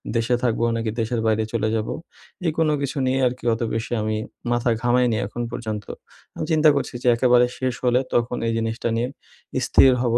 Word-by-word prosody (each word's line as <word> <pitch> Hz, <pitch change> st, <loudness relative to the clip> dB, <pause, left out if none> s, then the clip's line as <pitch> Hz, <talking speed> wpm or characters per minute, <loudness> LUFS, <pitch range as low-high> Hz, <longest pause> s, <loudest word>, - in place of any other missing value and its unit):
দেশে 115 Hz, +2 st, +2 dB
থাকবো 115 Hz, -1 st, +1 dB
নাকি 115 Hz, -1 st, -1 dB
দেশের 115 Hz, +1 st, -1 dB
বাইরে 110 Hz, 0 st, +2 dB
চলে 110 Hz, -1 st, 0 dB
যাবো? 110 Hz, 0 st, -2 dB, 0.5 s
এই 165 Hz, -, +2 dB
কোন 160 Hz, -1 st, +3 dB
কিছু 140 Hz, +1 st, -3 dB
নিয়ে 130 Hz, +1 st, +1 dB
আরকি 125 Hz, +1 st, -5 dB
অত 115 Hz, -, -4 dB
বেশি 115 Hz, +2 st, -3 dB
আমি 110 Hz, 0 st, -1 dB, 0.3 s
মাথা 120 Hz, +1 st, +1 dB
ঘামাইনি 120 Hz, -1 st, +2 dB
এখন 120 Hz, -, -5 dB
পর্যন্ত। 110 Hz, -3 st, -4 dB, 0.5 s
আমি -, -, -3 dB
চিন্তা 155 Hz, -1 st, +5 dB
করছি 140 Hz, -, -2 dB
যে -, -, 0 dB
একেবারে 125 Hz, 0 st, +5 dB
শেষ 130 Hz, -1 st, -1 dB
হলে 125 Hz, 0 st, +4 dB
তখন 120 Hz, +1 st, +1 dB
এই -, -, +1 dB
জিনিসটা 115 Hz, +1 st, -2 dB
নিয়ে 120 Hz, +2 st, 0 dB, 0.5 s
স্থির 135 Hz, -1 st, +5 dB
হবো 120 Hz, -2 st, +2 dB
120 Hz, 190 wpm, -23 LUFS, 115-125 Hz, 0.5 s, চিন্তা